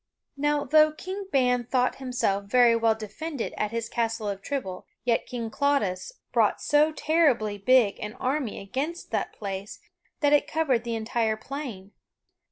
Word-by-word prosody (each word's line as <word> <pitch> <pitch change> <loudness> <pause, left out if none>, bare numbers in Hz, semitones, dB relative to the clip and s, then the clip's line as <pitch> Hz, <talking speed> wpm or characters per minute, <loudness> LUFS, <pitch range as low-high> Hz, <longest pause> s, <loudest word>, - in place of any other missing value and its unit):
Now, 295 +1 +1
though 310 0 +5
King 380 +5 -6
Ban 250 -2 +3
thought 250 +1 +1
himself 245 -7 -1
very 240 +2 +5
well 225 -1 +3
defended 235 +6 -5
at 210 - -1
his 230 +1 -3
Castle 225 -2 -2
of 195 -1 -4
Trible, 190 -8 -4 0.2
yet 235 -1 +1
King 230 -3 -4
Claudas 280 - 0 0.2
brought - - +3
so 300 +1 +3
terribly 290 -11 +2
big 230 -1 +4
an 210 0 -5
army 260 -1 -2
against 275 - -4
that - - -1
place 200 -1 -6 0.4
that 290 -1 +4
it 295 0 +4
covered 275 -7 +1
the 235 -1 -2
entire 220 0 0
plain. 225 -6 -7
245 Hz, 155 wpm, -26 LUFS, 215-290 Hz, 0.4 s, though